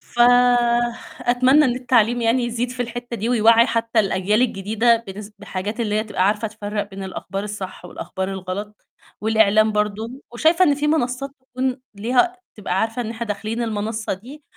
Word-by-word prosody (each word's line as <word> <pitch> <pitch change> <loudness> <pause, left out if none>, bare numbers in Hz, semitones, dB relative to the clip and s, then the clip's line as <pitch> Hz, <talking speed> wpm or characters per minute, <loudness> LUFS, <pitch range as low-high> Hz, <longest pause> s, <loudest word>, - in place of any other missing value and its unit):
فأتمنى 245 +2 +3
إن 245 -1 +1
التعليم 240 -2 +2
يعني 235 +2 +2
يزيد 240 +1 -2
في 250 0 -4
الحتّة 240 0 -5
دي 225 +2 -2
ويوعّي 230 0 +5
حتّى 230 -1 0
الأجيال 200 +2 +1
الجديدة 225 +1 +2
بنس 200 +2 -8
بحاجات 205 +2 -5
اللي 210 -2 0
هي 215 - +1
تبقى 200 -3 0
عارفة 210 +2 0
تفرَّق 205 -1 -4
بين 195 0 -7
الأخبار 195 +1 -5
الصح 200 -3 -7
والأخبار 190 +2 -5
الغلط، 195 +2 -6 0.3
والإعلام 215 0 +4
برضه، 215 +5 -2
وشايفة 325 +9 +3
إن 290 -3 +3
في 295 +1 -1
منصّات 275 -3 0
تكون 255 0 -3
ليها 250 - +1 0.2
تبقى 195 -3 -1
عارفة 225 +2 -1
إن 225 -1 -4
إحنا 235 0 -5
داخلين 215 +3 -3
المنصّة 220 0 -2
دي 260 +10 -11
225 Hz, 160 wpm, -21 LUFS, 210-245 Hz, 0.3 s, ويوعّي